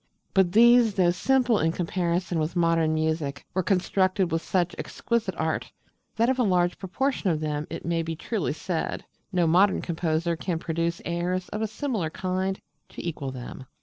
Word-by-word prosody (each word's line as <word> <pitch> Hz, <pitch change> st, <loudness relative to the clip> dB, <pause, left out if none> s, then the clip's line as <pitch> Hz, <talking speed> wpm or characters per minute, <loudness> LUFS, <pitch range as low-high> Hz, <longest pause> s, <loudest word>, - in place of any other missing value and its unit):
But 190 Hz, -2 st, +4 dB
these, 235 Hz, -1 st, +6 dB
though 180 Hz, -2 st, +4 dB
simple 245 Hz, +4 st, +2 dB
in 160 Hz, +1 st, +2 dB
comparison 175 Hz, 0 st, -1 dB
with 155 Hz, +3 st, -2 dB
modern 165 Hz, -2 st, +2 dB
music, 155 Hz, -3 st, -1 dB
were 185 Hz, -, +1 dB
constructed 185 Hz, 0 st, +1 dB
with 165 Hz, 0 st, 0 dB
such 175 Hz, -1 st, 0 dB
exquisite 225 Hz, -6 st, -2 dB
art 160 Hz, 0 st, -2 dB, 0.4 s
that 230 Hz, +1 st, +2 dB
of 260 Hz, 0 st, +1 dB
a -, -, +4 dB
large 180 Hz, -4 st, +2 dB
proportion 215 Hz, +3 st, -1 dB
of 160 Hz, -3 st, +1 dB
them 150 Hz, 0 st, -2 dB
it -, -, -6 dB
may 170 Hz, 0 st, 0 dB
be 165 Hz, 0 st, -4 dB
truly 200 Hz, 0 st, -2 dB
said 165 Hz, +1 st, -3 dB, 0.3 s
no 180 Hz, -2 st, +2 dB
modern 185 Hz, +5 st, +4 dB
composer 170 Hz, 0 st, -1 dB
can 170 Hz, +1 st, -2 dB
produce 165 Hz, +1 st, -2 dB
airs 180 Hz, +2 st, -2 dB
of 210 Hz, -, -4 dB
a 220 Hz, -, +1 dB
similar 220 Hz, -, -2 dB
kind 185 Hz, +3 st, -2 dB, 0.3 s
to -, -, -7 dB
equal 145 Hz, -5 st, -3 dB
them. 130 Hz, 0 st, -8 dB
175 Hz, 175 wpm, -26 LUFS, 165-195 Hz, 0.4 s, these